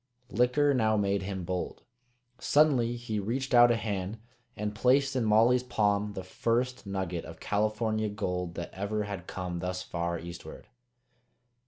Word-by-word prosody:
Liquor 125 Hz, +5 st, +3 dB
now 110 Hz, -4 st, +2 dB
made 100 Hz, -1 st, +1 dB
him 95 Hz, -1 st, -4 dB
bold. 90 Hz, +1 st, -4 dB, 0.6 s
Suddenly 135 Hz, -6 st, +3 dB
he 120 Hz, -3 st, -3 dB
reached 130 Hz, +7 st, -2 dB
out 120 Hz, 0 st, +8 dB
a 120 Hz, -, +4 dB
hand 100 Hz, -1 st, -3 dB, 0.4 s
and 105 Hz, 0 st, -2 dB
placed 135 Hz, +5 st, +3 dB
in 125 Hz, -, +1 dB
Molly's 115 Hz, +3 st, +4 dB
palm 105 Hz, -4 st, 0 dB
the 95 Hz, -, -5 dB
first 120 Hz, +5 st, -1 dB
nugget 95 Hz, -3 st, -3 dB
of 80 Hz, -, -10 dB
California 110 Hz, +1 st, 0 dB
gold 90 Hz, -4 st, -3 dB
that 85 Hz, -, -6 dB
ever 105 Hz, +2 st, -2 dB
had 100 Hz, -3 st, -6 dB
come 90 Hz, -2 st, -4 dB
thus 90 Hz, +1 st, -3 dB
far 85 Hz, -1 st, -2 dB
eastward. 85 Hz, +1 st, -9 dB
105 Hz, 150 wpm, -29 LUFS, 95-120 Hz, 0.6 s, out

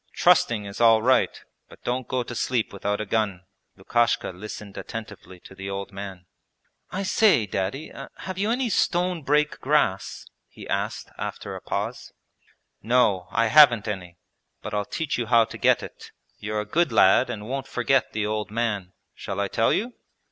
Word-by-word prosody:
Trusting 110 Hz, -3 st, +3 dB
is 100 Hz, +3 st, -6 dB
all 115 Hz, -1 st, +6 dB
right, 130 Hz, +2 st, +3 dB, 0.3 s
but -, -, -17 dB
don't 125 Hz, 0 st, -2 dB
go 130 Hz, -1 st, -1 dB
to 120 Hz, -, -8 dB
sleep 120 Hz, -2 st, -1 dB
without 100 Hz, +1 st, -2 dB
a 110 Hz, -, -3 dB
gun.' 100 Hz, -5 st, -1 dB, 0.3 s
Lukashka 120 Hz, +5 st, +1 dB
listened 100 Hz, +2 st, -9 dB
attentively 105 Hz, -4 st, -8 dB
to -, -, -13 dB
the 95 Hz, 0 st, -7 dB
old 100 Hz, 0 st, -5 dB
man. 95 Hz, -2 st, -8 dB, 0.6 s
'I 190 Hz, +2 st, -3 dB
say. 195 Hz, -, +4 dB
Daddy, 100 Hz, +10 st, -3 dB, 0.3 s
have 185 Hz, 0 st, -6 dB
you 205 Hz, +2 st, +1 dB
any 250 Hz, +2 st, +1 dB
stone 180 Hz, -4 st, +1 dB
break 150 Hz, +3 st, +1 dB
grass?' 135 Hz, -9 st, 0 dB, 0.2 s
he -, -, -12 dB
asked -, -, -3 dB
after -, -, -5 dB
a -, -, -8 dB
pause. -, -, -4 dB, 0.7 s
'No, 110 Hz, -6 st, +2 dB
I 115 Hz, 0 st, +1 dB
haven't 125 Hz, -9 st, +6 dB
any, 90 Hz, -4 st, -5 dB, 0.5 s
but -, -, -6 dB
I'll 105 Hz, -1 st, 0 dB
teach 155 Hz, +1 st, -3 dB
you 120 Hz, -, -2 dB
how 115 Hz, -1 st, +5 dB
to -, -, -9 dB
get -, -, +3 dB
it. -, -, -10 dB, 0.3 s
You're 105 Hz, 0 st, -2 dB
a -, -, -6 dB
good 170 Hz, +11 st, +1 dB
lad 110 Hz, +7 st, +5 dB
and 105 Hz, -3 st, -5 dB
won't 135 Hz, +1 st, -4 dB
forget 130 Hz, +2 st, +1 dB
the 105 Hz, -1 st, -2 dB
old 105 Hz, 0 st, -2 dB
man.... 105 Hz, -5 st, -2 dB, 0.2 s
Shall 100 Hz, -1 st, -6 dB
I 100 Hz, -1 st, 0 dB
tell 115 Hz, +3 st, +2 dB
you?' 240 Hz, +4 st, -1 dB
115 Hz, 175 wpm, -25 LUFS, 100-135 Hz, 0.7 s, all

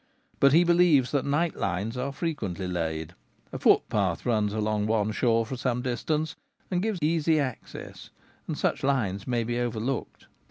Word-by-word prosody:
But 140 Hz, -, +6 dB
he 170 Hz, +3 st, +7 dB
believes 170 Hz, -7 st, +4 dB
that 140 Hz, -2 st, 0 dB
night 155 Hz, +4 st, +1 dB
lines 100 Hz, +5 st, -2 dB
are 130 Hz, +2 st, -2 dB
frequently 110 Hz, -, -3 dB
laid: 80 Hz, -3 st, -3 dB, 0.4 s
a -, -, -4 dB
footpath -, -, +2 dB
runs 105 Hz, -4 st, +1 dB
along 105 Hz, 0 st, 0 dB
one 110 Hz, -1 st, +1 dB
shore 115 Hz, +1 st, +2 dB
for 130 Hz, -, -5 dB
some 125 Hz, -1 st, -1 dB
distance, 150 Hz, +6 st, -1 dB, 0.4 s
and 180 Hz, -1 st, +1 dB
gives 215 Hz, -1 st, -1 dB
easy 160 Hz, 0 st, +2 dB
access, 130 Hz, -5 st, -6 dB, 0.4 s
and -, -, -3 dB
such -, -, 0 dB
lines 105 Hz, -8 st, 0 dB
may 120 Hz, -2 st, 0 dB
be 120 Hz, +1 st, -2 dB
overlooked. 120 Hz, +1 st, -3 dB
125 Hz, 160 wpm, -27 LUFS, 110-150 Hz, 0.4 s, he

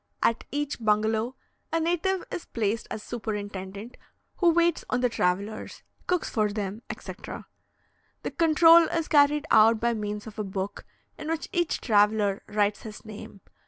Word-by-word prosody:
At 230 Hz, -, +1 dB
each 290 Hz, -1 st, -2 dB
bungalow, 220 Hz, +3 st, +1 dB, 0.4 s
a 330 Hz, -, +1 dB
native 350 Hz, +3 st, 0 dB
is 345 Hz, -, -5 dB
placed 220 Hz, -1 st, -2 dB
as 215 Hz, -, -5 dB
superintendent, 205 Hz, -1 st, -6 dB, 0.4 s
who 350 Hz, -, +4 dB
waits 340 Hz, 0 st, +2 dB
on 250 Hz, -, 0 dB
the 250 Hz, -, +3 dB
travellers, 200 Hz, +1 st, -2 dB, 0.2 s
cooks 360 Hz, -2 st, 0 dB
for 215 Hz, -3 st, 0 dB
them, 205 Hz, +1 st, -4 dB
etc. -, -, -8 dB, 0.8 s
The -, -, -3 dB
control 330 Hz, +1 st, +6 dB
is 330 Hz, 0 st, -2 dB
carried 295 Hz, 0 st, +4 dB
out 220 Hz, +1 st, +6 dB
by 235 Hz, +1 st, +1 dB
means 210 Hz, -1 st, -4 dB
of 220 Hz, -1 st, -9 dB
a -, -, 0 dB
book, 190 Hz, 0 st, -5 dB, 0.3 s
in 305 Hz, -, -6 dB
which 325 Hz, 0 st, -3 dB
each 345 Hz, -4 st, 0 dB
traveller 210 Hz, -2 st, +3 dB
writes 205 Hz, -1 st, 0 dB
his 215 Hz, 0 st, -10 dB
name. 210 Hz, -2 st, -10 dB
220 Hz, 155 wpm, -27 LUFS, 210-310 Hz, 0.8 s, control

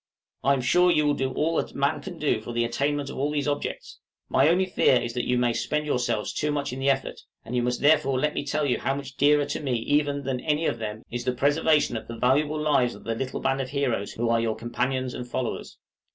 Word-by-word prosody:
I 140 Hz, +3 st, +4 dB
am 135 Hz, -, 0 dB
sure 180 Hz, +7 st, +4 dB
you 150 Hz, -3 st, +3 dB
will 145 Hz, -, +3 dB
do 135 Hz, -2 st, -1 dB
all 160 Hz, +2 st, 0 dB
that -, -, -2 dB
man 140 Hz, +2 st, 0 dB
can 175 Hz, +2 st, -8 dB
do 145 Hz, -8 st, 0 dB
for 120 Hz, +2 st, -7 dB
the 120 Hz, 0 st, +1 dB
attainment 140 Hz, +4 st, -1 dB
of -, -, -7 dB
all 145 Hz, +2 st, +1 dB
these 150 Hz, -1 st, -1 dB
objects; 145 Hz, 0 st, -4 dB, 0.3 s
my 135 Hz, +3 st, +4 dB
only 185 Hz, +3 st, +3 dB
fear 180 Hz, -7 st, +3 dB
is 120 Hz, -1 st, -4 dB
that 125 Hz, -, -2 dB
you 125 Hz, -, +2 dB
may 120 Hz, -1 st, +2 dB
spend 150 Hz, +5 st, -1 dB
yourselves 120 Hz, -6 st, -1 dB
too 150 Hz, 0 st, -1 dB
much 145 Hz, -3 st, -2 dB
in 130 Hz, -, -5 dB
the 135 Hz, +1 st, +1 dB
effort; 135 Hz, -1 st, -1 dB, 0.3 s
and 125 Hz, -, -5 dB
you 125 Hz, -, +2 dB
must 125 Hz, 0 st, -1 dB
therefore 145 Hz, -3 st, +4 dB
let 150 Hz, +2 st, 0 dB
me -, -, -2 dB
tell 150 Hz, +1 st, -1 dB
you 130 Hz, -, +1 dB
how 135 Hz, -, -1 dB
much 140 Hz, -1 st, -7 dB
dearer 145 Hz, +1 st, +4 dB
to 145 Hz, -, -3 dB
me 135 Hz, -4 st, -2 dB
even 145 Hz, +4 st, 0 dB
than 130 Hz, -1 st, -2 dB
any 155 Hz, +3 st, 0 dB
of 120 Hz, -, -1 dB
them 110 Hz, 0 st, -5 dB
is 120 Hz, 0 st, -3 dB
the 125 Hz, 0 st, 0 dB
preservation 145 Hz, +1 st, +2 dB
of 110 Hz, -, -8 dB
the 115 Hz, -, -7 dB
valuable 145 Hz, +5 st, +2 dB
lives 140 Hz, -5 st, +2 dB
of -, -, -13 dB
the 115 Hz, -, -2 dB
little 130 Hz, +3 st, -4 dB
band 135 Hz, 0 st, 0 dB
of 130 Hz, -, -5 dB
heroes 130 Hz, -7 st, -1 dB
who 120 Hz, +1 st, -2 dB
are 115 Hz, 0 st, +2 dB
your 115 Hz, -1 st, -1 dB
companions 130 Hz, +2 st, -2 dB
and 125 Hz, -, -6 dB
followers. 125 Hz, 0 st, -4 dB
135 Hz, 255 wpm, -26 LUFS, 125-150 Hz, 0.3 s, I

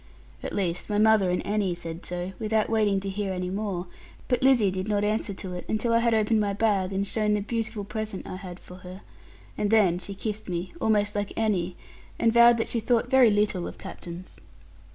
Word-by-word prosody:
At -, -, -5 dB
least, 180 Hz, -1 st, -2 dB
my 205 Hz, -, 0 dB
mother 215 Hz, -3 st, +4 dB
and 180 Hz, -, -1 dB
Annie 200 Hz, -3 st, 0 dB
said 170 Hz, 0 st, -7 dB
so, 180 Hz, +1 st, -4 dB
without 220 Hz, 0 st, 0 dB
waiting 210 Hz, -3 st, +2 dB
to 195 Hz, -, -5 dB
hear 195 Hz, 0 st, -2 dB
any 180 Hz, 0 st, -3 dB
more; 195 Hz, -3 st, -3 dB, 0.4 s
but 250 Hz, -2 st, +1 dB
Lizzie 250 Hz, -7 st, +4 dB
did 185 Hz, +1 st, -4 dB
not 205 Hz, -1 st, +1 dB
answer 215 Hz, 0 st, 0 dB
to 185 Hz, -1 st, -6 dB
it, 180 Hz, -, -5 dB
until 220 Hz, +2 st, 0 dB
I 230 Hz, -, +5 dB
had 230 Hz, -1 st, +2 dB
opened 220 Hz, 0 st, +2 dB
my 205 Hz, -1 st, 0 dB
bag 200 Hz, -3 st, +1 dB
and 195 Hz, +1 st, -1 dB
shown 210 Hz, 0 st, +1 dB
the -, -, 0 dB
beautiful 220 Hz, 0 st, -3 dB
present 215 Hz, -1 st, -5 dB
I 185 Hz, -, -6 dB
had 185 Hz, -2 st, -9 dB
for 180 Hz, -, -12 dB
her. 185 Hz, +1 st, -11 dB, 0.6 s
And 205 Hz, -, +1 dB
then 195 Hz, -5 st, +4 dB
she 195 Hz, +2 st, -7 dB
kissed 215 Hz, 0 st, -5 dB
me, 175 Hz, +1 st, -4 dB
almost 210 Hz, -1 st, +2 dB
like 205 Hz, -1 st, -3 dB
Annie, 190 Hz, -5 st, 0 dB, 0.4 s
and 230 Hz, -, +2 dB
vowed 235 Hz, 0 st, +7 dB
that 225 Hz, -, -1 dB
she 235 Hz, -, +1 dB
thought 240 Hz, +2 st, +1 dB
very 260 Hz, -3 st, +7 dB
little 205 Hz, -3 st, +1 dB
of -, -, -9 dB
captains. 175 Hz, +2 st, -9 dB
205 Hz, 215 wpm, -26 LUFS, 185-220 Hz, 0.6 s, vowed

